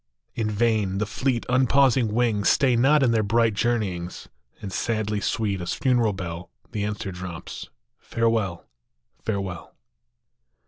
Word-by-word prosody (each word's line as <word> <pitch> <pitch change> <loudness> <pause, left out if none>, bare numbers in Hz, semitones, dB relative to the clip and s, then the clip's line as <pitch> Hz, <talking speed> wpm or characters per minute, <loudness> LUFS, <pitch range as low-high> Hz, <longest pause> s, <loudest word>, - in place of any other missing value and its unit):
In 110 -2 -1
vain: 105 -3 +1
the 105 - 0
fleet, 125 +2 -1
unpausing 130 -2 +3
wings 110 -3 +2
Stay 130 -3 +3
not 135 +5 +4
in 125 - +4
their 115 -1 +3
bright 115 +2 +2
journeyings; 100 -6 -2 0.3
And 95 -2 -7
sadly 110 -1 -1
sweet 105 -5 -1
as 85 - -2
funeral 120 -5 +2
bell 85 -2 -6 0.2
The 105 -3 -2
answer 105 -1 -3
drops, 90 -2 -7
" - - -54
Farewell! 115 -7 0 0.6
Farewell"! 100 -5 -4
110 Hz, 135 wpm, -24 LUFS, 100-120 Hz, 0.6 s, not